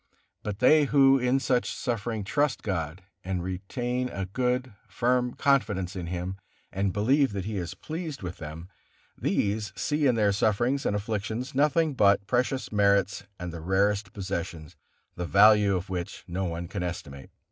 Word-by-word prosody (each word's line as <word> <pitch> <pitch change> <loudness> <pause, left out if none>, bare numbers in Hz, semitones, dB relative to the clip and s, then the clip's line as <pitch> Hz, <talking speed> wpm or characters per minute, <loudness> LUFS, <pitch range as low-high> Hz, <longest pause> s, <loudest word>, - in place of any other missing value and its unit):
But 105 -2 -4
they 150 +5 +5
who 135 -1 +5
in 125 +2 +2
such 125 -2 0
suffering 115 -2 -3
trust 145 +7 0
God 85 -3 -3 0.2
and 95 -1 -2
retain 120 +7 -3
a 95 -5 -4
good, 125 +4 -1
firm 125 +4 0
confidence 105 -10 +1
in 90 -2 -4
Him, 90 +2 -4 0.3
and 95 0 0
believe 130 +6 +2
that 95 -2 -3
He 105 -1 -3
is 90 0 -4
pleased 160 - -6
with 90 0 -5
them, 80 +2 -8 0.5
these 105 -1 -1
see 150 +7 +1
in 125 - +3
their 105 -2 +3
sufferings 120 +7 +1
and 105 - 0
afflictions 110 +5 -3
nothing 150 +3 +2
but 100 -4 +4
precious 125 +4 0
merits 100 -1 +2
and 90 -1 -5
the 85 - -7
rarest 100 +3 +1
possessions, 85 -6 -5 0.4
the 90 0 -4
value 105 0 +6
of 90 +1 -3
which 90 -2 -5
no 95 +2 -2
one 85 0 -4
can 100 +1 -5
estimate. 75 -6 -6
100 Hz, 160 wpm, -27 LUFS, 95-125 Hz, 0.5 s, value